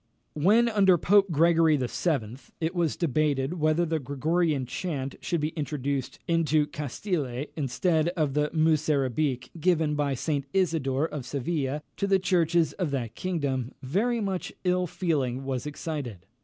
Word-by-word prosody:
When, 210 +10 +4
under 195 -5 +4
Pope 200 +3 +4
Gregory 165 -1 +4
VII., 125 -3 -1 0.2
it 165 +1 -1
was 170 -4 0
debated 150 0 0
whether 155 +2 +2
the 160 -1 -1
Gregorian 150 +1 0
chant 135 -1 -4
should 170 -3 -1
be 150 - 0
introduced 140 -3 -3
into 160 -3 +2
Castile, 145 - -3
instead 155 +3 +1
of 150 -4 +1
the 150 +1 +1
Musarabic, 150 -5 +1
given 160 -3 +2
by 145 -2 0
St. 140 +1 -2
Isidore 160 -6 +1
of 140 -6 -6
Seville 145 0 -2
to 200 - 0
the 195 -1 +4
churches 170 -4 +2
of 180 -5 -2
that 120 -5 -3
kingdom, 140 -7 -2
very 215 - 0
much 195 -4 -2
ill 180 -1 +1
feeling 140 -8 -1
was 135 0 -3
excited. 145 - -5
155 Hz, 140 wpm, -27 LUFS, 135-170 Hz, 0.2 s, When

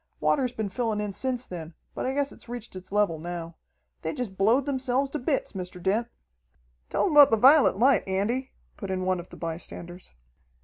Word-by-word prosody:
Water's 255 -4 +2
been 220 -4 -3
fillin' 220 +1 -1
in 210 -1 -3
since 255 +3 -2
then, 165 -2 -8 0.2
but - - -3
I 260 - -1
guess 285 0 0
it's - - -14
reached 240 -4 -7
its 185 0 -10
level 200 -6 +1
now. 170 0 -6 0.4
They - - -3
jest 245 -8 -4
blowed 225 +8 +3
themselves 265 -1 0
to 300 - -3
bits, 270 +2 -1
Mr. 180 -2 -6
Dent." 205 +6 0 0.8
"Tell - - +1
him 385 - +1
about 295 -2 +9
the 225 - +3
vi'let 270 0 +6
light, 255 +2 +4
Andy," 225 +8 -1 0.3
put 195 - -6
in 185 -1 -2
one 185 -1 +1
of 175 - -9
the - - -12
bystanders. 175 +1 -6
215 Hz, 200 wpm, -27 LUFS, 185-260 Hz, 0.8 s, about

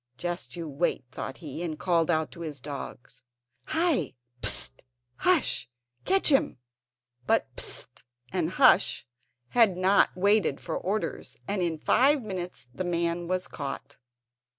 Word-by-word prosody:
"Just 175 +3 -4
you 170 -2 -5
wait," 145 -1 -1
thought 130 - -6
he, 155 -1 -7
and 160 -3 -3
called 170 -2 +1
out 160 -2 +1
to 170 - -10
his 150 -4 -6
dogs: 140 -2 -8 0.4
"Hi! 315 - +1 0.3
Psst, 105 -1 +2 0.4
Hush, 330 - +2 0.4
catch 385 -2 +3
him!" 270 - +2 0.7
But - - +1
Psst 120 - -2 0.3
and 175 -4 0
Hush 205 - +4 0.4
had 220 -7 +4
not 190 +2 +4
waited 200 +3 +3
for 165 - -4
orders, 205 +4 -3
and 200 -1 -1
in 170 -2 0
five 270 - +3
minutes 180 - -5
the 185 - -3
man 170 -1 -1
was 185 +1 -1
caught. 140 -1 -6
175 Hz, 135 wpm, -28 LUFS, 155-200 Hz, 0.7 s, Hush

